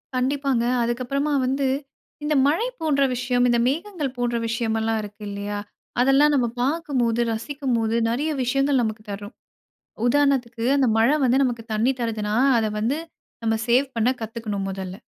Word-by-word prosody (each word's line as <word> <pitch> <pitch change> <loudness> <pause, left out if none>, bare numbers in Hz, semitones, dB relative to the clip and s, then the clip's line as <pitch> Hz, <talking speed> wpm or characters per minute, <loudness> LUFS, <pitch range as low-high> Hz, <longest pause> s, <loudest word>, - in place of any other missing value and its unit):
கண்டிப்பாங்க. 265 -1 +1 0.2
அதுக்கப்புறமா 255 +5 -1
வந்து, 270 +1 0 0.6
இந்த 300 0 +1
மழை 370 +12 +1
போன்ற 285 -3 +2
விஷயம், 245 0 +1
இந்த 235 - +3
மேகங்கள் 305 -3 -2
போன்ற 240 -1 -1
விஷயமெல்லாம் 225 -1 0
இருக்கு. 205 +1 -11
இல்லையா? 205 +1 -4 0.4
அதெல்லாம் 275 +3 +5
நம்ம 250 -3 +2 0.2
பார்க்கும்போது, 260 -6 0
ரசிக்கும்போது, 235 -2 -1
நெறைய 280 +7 -1
விஷயங்கள் 275 +1 +2
நமக்கு 215 -1 -3
தரும். 205 +3 -7 0.7
உதாரணத்துக்கு, 250 -4 +1
அந்த 270 -3 +3
மழை 240 +7 +4
வந்து 260 +2 +3
நமக்கு 235 -3 -2
தண்ணீ 225 +5 +2
தருதுனா, 215 -2 -2 0.2
அதை 220 -1 0
வந்து 260 +8 0 0.5
நம்ம 225 0 +2
சேவ் 260 +4 +3
பண்ண 230 +1 +2
கத்துக்கணும் 215 -3 -4
முதல்ல. 190 -1 -5
245 Hz, 140 wpm, -23 LUFS, 225-275 Hz, 0.7 s, அதெல்லாம்